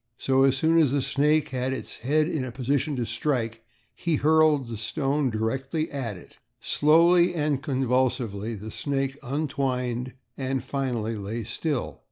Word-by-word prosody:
So, 135 0 +3
as 135 -1 +3
soon 160 +4 +3
as 155 -4 +4
the 140 +2 +1
snake 150 +2 +2
had 130 0 -1
its 130 - -6
head 150 +5 +1
in 155 -5 -2
a 130 - -5
position 140 +3 -1
to 120 -2 -1
strike 115 -1 -2 0.3
he 170 -2 -1
hurled 155 -2 +4
the 115 - -5
stone 135 +5 -1
directly 135 +8 -2
at 125 -8 -4
it. - - -16 0.2
Slowly 170 +3 +4
and 150 -3 0
convulsively 125 -5 0
the 110 +2 -8
snake 135 +1 -2
untwined 130 -3 -2 0.2
and 130 -1 -2
finally 125 -5 -2
lay 105 +3 -4
still. 130 +5 -3
135 Hz, 155 wpm, -26 LUFS, 120-150 Hz, 0.3 s, as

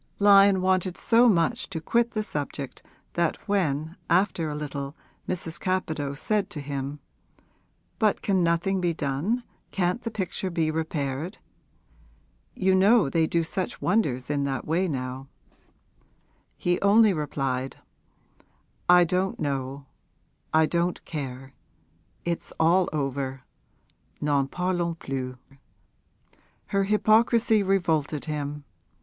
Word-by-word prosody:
Lyon 200 -2 +6
wanted 185 -1 +1
so 235 +1 +5
much 210 +6 +1
to 175 -5 -4
quit 235 +8 +1
the 215 -2 -1
subject 145 -7 -5 0.3
that 170 -1 +1
when 160 -5 0
after 175 -2 +2
a 150 - -4
little 140 -1 -5 0.3
Mrs. 170 -2 -3
Capadose 155 -6 -2
said 210 -2 0
to 165 - -6
him, 140 0 -4 1.0
'But 215 -3 +2
can 190 -3 +2
nothing 170 +3 +1
be 170 -2 0
done, 155 - -1 0.3
can't 180 +4 0
the 230 - -3
picture 190 -3 -3
be 165 -3 0
repaired? 155 0 -3 1.2
You 190 0 +2
know 195 - +5
they 165 -1 +2
do 170 0 +1
such 185 +3 -3
wonders 145 - 0
in 145 -1 0
that 135 -3 -3
way 175 +4 +1
now,' 130 -2 -4 1.3
he 175 0 0
only 210 +1 +5
replied, 135 -4 -2 1.1
'I 180 0 +8
don't 185 +2 -1
know, 140 -1 -3 0.7
I 160 0 +5
don't 170 +2 -1
care, 135 -3 -6 0.7
it's 170 -1 -3
all 175 +3 +4
over, 135 -3 -3 0.8
n'en 145 -2 +1
parlons 175 0 -1
plus!' 130 -2 -4 1.3
Her 195 -1 0
hypocrisy 220 +1 +3
revolted 165 -7 0
him. 150 -1 -4
170 Hz, 120 wpm, -26 LUFS, 145-190 Hz, 1.3 s, I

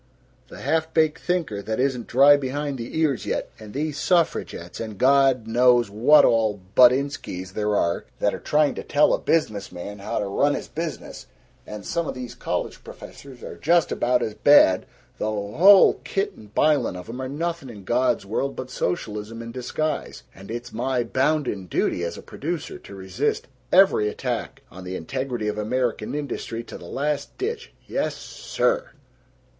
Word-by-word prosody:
The - - -11
half 160 0 0
baked 160 0 +2
thinker 165 - -1
that 110 +3 -3
isn't 130 -3 0
dry 140 +3 +7
behind 140 0 -3
the 115 +6 -5
ears 145 -7 0
yet, - - -2
and 110 -1 -10
these 145 +2 -3
suffragettes 165 - 0
and 110 -3 -6
God 135 -1 +4
knows 120 -1 +3
what 140 +8 +6
all 110 -3 +2 0.2
buttinskis 125 -8 +3
there 105 0 0
are 85 -3 0
that 105 - +1
are - - -5
trying 150 -1 +2
to - - -6
tell 145 - +3
a - - +1
business 110 -11 0
man 100 +4 -8
how 110 +4 -4
to 105 - -1
run 140 +9 +1
his - - -5
business, 165 0 -6 0.4
and 105 -2 -8
some 170 - -2
of - - -4
these 125 -1 -7
college - - -4
professors 135 -3 -12
are - - -8
just 170 +1 +2
about 125 0 +1
as 110 - -3
bad, 105 -7 +5 0.3
the - - -1
whole 110 - +5
kit 195 0 -2
and 105 0 -16
bilin' 150 -10 +2
of 90 0 -8
'em 125 +3 -6
are 130 - -4
nothing 165 0 -3
in 105 -4 -10
God's 120 +1 +1
world 135 +7 -2
but 130 0 -7
socialism 105 +3 -3
in 115 0 -7
disguise! 145 +5 -3
And 95 +1 -13
it's 120 +1 -6
my 125 +1 0
bounden 130 -6 0
duty 85 - 0
as 85 0 -4
a - - -10
producer 165 +2 -5
to 100 - -12
resist 95 +9 -2 0.2
every 185 - +5
attack - - -4
on 95 +1 -10
the 90 0 -5
integrity 125 +5 -3
of 105 0 -2
American 120 +2 -1
industry 130 -5 -4
to - - -10
the - - -11
last 145 +9 -3
ditch. 455 +3 -4
Yes - - -2
SIR!" - - -2
125 Hz, 175 wpm, -24 LUFS, 105-150 Hz, 0.4 s, dry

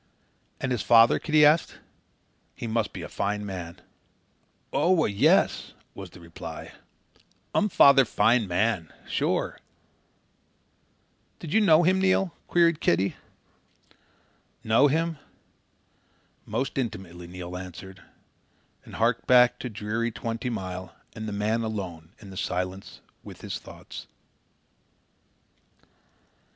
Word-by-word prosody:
"And 135 - -2
his 125 - 0
father?" 115 0 +6
Kitty 155 -1 +4
asked. 155 +2 +3 0.8
"He - - -7
must 110 -2 -1
be - - -7
a - - -6
fine 105 +1 -2
man." 90 -4 -7 0.9
"Oo 175 -2 +3
a, - - +1
yes," 100 -1 +2 0.2
was 95 -2 -9
the 90 - -15
reply. 85 -1 -9 0.8
"Um 210 - +2
father 140 -6 +7
fine 115 -1 +2
man. 90 -2 0 0.2
Sure!" - - -1 1.8
"Did 160 -3 -7
you 220 - +4
know 170 -4 +5
him, 185 +2 +3
Neil?" 190 -2 +2
queried 170 -2 +3
Kitty. 95 +3 +1 1.5
"Know 115 +6 +4
him? 160 +1 -1 1.3
Most 130 +6 -2
intimately," 90 -8 -5
Neil 90 0 -8
answered, 95 +1 -9 0.8
and - - -12
harked 115 +1 0
back 125 -1 +5
to 125 - -5
dreary 110 +2 -2
Twenty 115 +1 -4
Mile 95 -5 -6 0.2
and 110 -1 -6
the - - -4
man 105 +3 0
alone 95 -8 -5
in 100 -3 -13
the 95 - -10
silence 95 0 -4 0.2
with - - -11
his - - -5
thoughts. - - -11
110 Hz, 115 wpm, -26 LUFS, 95-135 Hz, 1.8 s, father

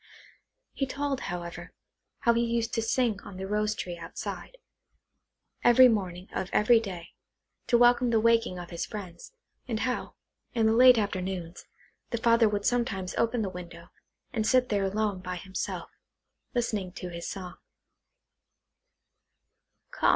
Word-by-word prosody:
He 270 - -1
told, 280 0 -2
however, 175 0 -6 0.5
how 235 - +4
he 235 0 +2
used 230 -1 -1
to 225 - +1
sing 225 -2 0
on 185 - -10
the 190 - -4
rose 210 +1 0
tree 175 -4 -5
outside, 170 - -7 1.1
every 240 +2 +8
morning 185 -5 -1
of 190 - -3
every 230 +2 +5
day, 185 -6 -7 0.6
to 240 - +4
welcome 245 +1 +5
the 225 -1 +3
waking 230 -4 +2
of 175 -1 -8
his 170 - -3
friends, 185 - -8 0.4
and 225 -3 -2
how, 255 -1 -2 0.4
in 225 -2 +3
the 220 - +4
late 250 +1 +8
afternoons, 185 -4 -3 0.4
the 235 - -1
father 230 -1 +4
would 205 -1 -2
sometimes 235 -7 0
open 230 0 +1
the - - -1
window, 170 -1 -10 0.4
and 220 -2 0
sit 255 0 +3
there 200 -2 +1
alone 205 0 -1
by 180 0 -5
himself, 190 +1 -5 0.6
listening 215 -6 -1
to 180 -2 -6
his 170 -1 -6
song. 185 -2 -7
210 Hz, 145 wpm, -28 LUFS, 185-235 Hz, 1.1 s, every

